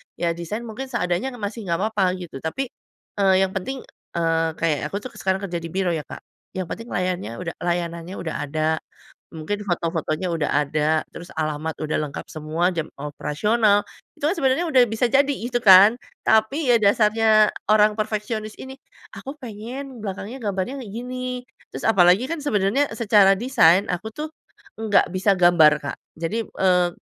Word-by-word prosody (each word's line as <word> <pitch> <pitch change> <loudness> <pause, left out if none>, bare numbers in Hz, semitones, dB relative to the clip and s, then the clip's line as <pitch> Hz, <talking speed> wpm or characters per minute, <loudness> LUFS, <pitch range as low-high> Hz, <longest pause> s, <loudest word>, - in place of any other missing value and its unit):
Ya 170 -1 0
desain 170 +7 -5
mungkin 235 +4 -6
seadanya, 240 +1 -2
kan - - -12
masih 210 +2 -4
gak 170 -1 0
papa, 205 -4 +1
gitu. 170 -7 -8
Tapi, 255 +12 -2 0.5
eee, 190 -1 +4
yang 190 - -1
penting, 265 +8 -3 0.4
eee, 165 -1 +1
kayak 160 -4 0
aku - - -5
tuh, 255 - -6
sekarang 190 0 0
kerja 175 -3 -3
di 165 - -4
biro 190 -1 0
ya, 155 - -4
Kak, - - -9 0.4
yang 185 - -2
penting 230 +8 -7
layannya 180 - -2
uda 170 -1 -4
layanannya 170 +1 -2
udah 165 -3 -4
ada, 155 +1 0 0.6
mungkin 165 +6 -4
foto-fotonya 170 -2 -2
udah 160 -3 -1 0.2
ada, 155 +2 0
terus 175 +1 -9
alamat 155 0 -2
udah 155 0 -1
lengkap, 140 - -7
semua 155 +3 -1
jam 165 -2 -3
operasional. 205 +9 +1 0.3
Itu 290 - +1
kan 345 - +1
sebenarnya 270 +6 +1
udah 260 -5 +5
bisa 220 +3 +1
jadi 275 +4 +3
itu 240 -2 -2
kan. 195 +3 +8 0.3
Tapi, 220 +7 +3
ya - - +6
dasarnya 215 +1 +4 0.2
orang 215 0 +5
perfeksionis 215 0 -3
ini. 265 0 -8 0.4
Aku 275 +3 -8
pengen 245 +2 -8
belakangnya 210 +6 -6
gambarnya 205 +7 -2
kayak 210 - -10
gini, 250 +2 -5 0.3
terus - - -6
apalagi 190 +1 +5
kan 325 0 -4
sebenarnya 235 +2 +1
secara 205 -4 +5
desain, 200 -7 +4
aku 180 +5 -3
tuh, 300 +7 -5 0.5
nggak 215 -2 +3
bisa 190 +2 +3
gambar, 170 -4 +6
Kak. 140 - -4 0.2
Jadi, 205 +8 -2
eee, 180 -4 +2
200 Hz, 165 wpm, -23 LUFS, 170-230 Hz, 0.6 s, kan